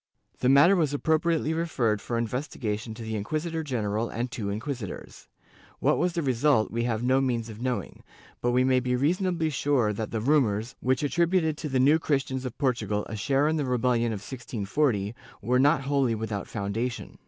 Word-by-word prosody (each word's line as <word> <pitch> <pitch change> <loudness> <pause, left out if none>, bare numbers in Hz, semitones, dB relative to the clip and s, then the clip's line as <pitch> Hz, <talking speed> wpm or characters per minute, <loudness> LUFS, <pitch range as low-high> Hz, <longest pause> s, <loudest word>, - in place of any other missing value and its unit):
The 125 - +2
matter 145 +8 +7
was 155 -5 +1
appropriately 160 +1 +1
referred 130 -11 0
for 120 - -3
investigation 115 -2 -3
to 115 - -8
the 110 0 -4
inquisitor 155 +10 -2
general 115 -6 -2
and 120 +2 -3
two 105 -6 -3
inquisitors.^ 110 0 -6 0.5
What - - +2
was 180 -1 +1
the 170 - -1
result, 130 -3 +2
we 115 +2 -1
have 115 -1 -1
no 130 +2 +3
means 120 -3 -1
of 110 +1 -9
knowing, 125 -7 -3 0.4
but 120 - +1
we 125 +1 +3
may 130 0 +3
be 125 0 0
reasonably 165 +3 +1
sure 130 -6 +1
that 110 +1 -4
the 115 - -2
rumors, 120 -3 +1
which 130 +2 0
attributed 170 +1 +2
to 155 - -4
the 130 -1 +1
New 145 +5 +5
Christians 135 -4 -1
of 125 - -6
Portugal 110 -6 0
a 110 - -4
share 135 +7 +1
in 160 +1 +1
the 145 - -1
rebellion 125 -2 +1
of 105 -3 -4
1640, 115 -1 -1 0.3
were 125 +4 +1
not 140 +1 +4
wholly 135 -4 +1
without 105 -2 -4
foundation. 110 +4 -4
125 Hz, 185 wpm, -27 LUFS, 110-145 Hz, 0.5 s, matter